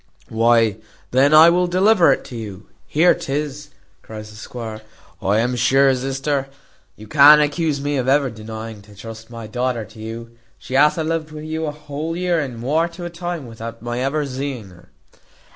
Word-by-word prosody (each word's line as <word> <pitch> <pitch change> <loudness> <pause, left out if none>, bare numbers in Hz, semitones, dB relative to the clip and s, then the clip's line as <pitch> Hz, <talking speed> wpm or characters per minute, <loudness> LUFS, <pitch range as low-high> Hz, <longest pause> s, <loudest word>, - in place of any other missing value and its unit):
"Why 115 -2 +3 0.3
then 135 +3 +4
I 160 +2 +8
will 180 +1 +2
deliver 185 -2 +4
it - - 0
to 125 - -9
you. 105 -3 -8 0.3
There 170 +4 +6
'tis," 145 +1 -4 0.3
cries 105 -1 -9
the - - -14
squire. 110 -1 -7 0.4
"I 100 +2 +1
am 120 +3 +1
sure, 135 +3 +4
sister, 135 +2 -2 0.5
you 110 - -13
can't 150 +4 +8
accuse 150 0 0
me 145 0 -2
of 130 -1 -1
ever 135 -1 +2
denying 110 0 -8
to 105 0 -17
trust 110 +2 -10
my 115 -1 -8
daughter 120 +1 -2
to 110 +2 -16
you. 115 +1 -7 0.3
She - - -10
hath 150 +4 +4
a 160 - 0
lived 160 0 -2
wi' 155 0 -8
you 160 +1 -3
a - - -2
whole 150 +2 -5
year 180 -2 +1
and 130 -6 -4
muore 155 +8 +1
to 175 +1 -7
a 175 - -6
time, 175 -3 -5
without 115 0 -9
my 120 0 -3
ever 140 +3 -1
zeeing 130 -5 -5
her." 90 - -18
135 Hz, 190 wpm, -20 LUFS, 115-150 Hz, 0.5 s, I